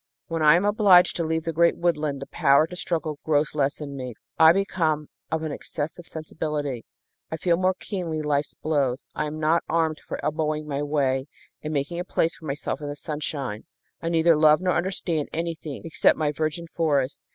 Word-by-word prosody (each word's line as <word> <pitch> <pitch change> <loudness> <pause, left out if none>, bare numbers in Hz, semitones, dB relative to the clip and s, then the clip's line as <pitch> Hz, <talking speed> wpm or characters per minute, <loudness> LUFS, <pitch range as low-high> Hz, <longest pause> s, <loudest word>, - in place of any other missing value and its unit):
When 165 -1 -2
I 150 +1 +7
am 180 +4 +2
obliged 205 -4 +5
to 170 - 0
leave 160 0 -1
the 165 -1 -3
great 170 +2 +3
woodland 150 -5 0
the - - -10
power 140 +3 +4
to 180 +2 -9
struggle 160 -4 -2
grows 150 -1 +1
less 145 -1 0
in 140 -2 -6
me. 125 -3 -6 0.2
I 160 0 +9
become 165 -5 0 0.2
of 160 0 -1
an 155 - -3
excessive 155 +4 -5
sensibility. 150 -5 -4 0.4
I 160 - -3
feel 170 +1 +2
more 185 +1 +1
keenly 170 -6 -4
life's 145 -1 -1
blows. 140 -4 -1
I 150 - -2
am 150 +1 -5
not 160 +2 +2
armed 160 -1 +1
for - - -7
elbowing 155 0 -1
my 140 -1 -2
way 140 -2 0 0.3
and 155 - -4
making 150 +4 -2
a - - -1
place 165 -2 0
for 160 - -13
myself 145 +1 -3
in 145 - -4
the 145 - -4
sunshine. 145 -7 -4 0.4
I 165 - -2
neither 165 0 +4
love 155 0 +5
nor 180 -1 +1
understand 175 -4 -1
anything 165 -3 -4
except 165 - +3
my 150 -2 +1
virgin 155 +2 -2
forest. 150 -5 0
155 Hz, 195 wpm, -25 LUFS, 145-165 Hz, 0.4 s, I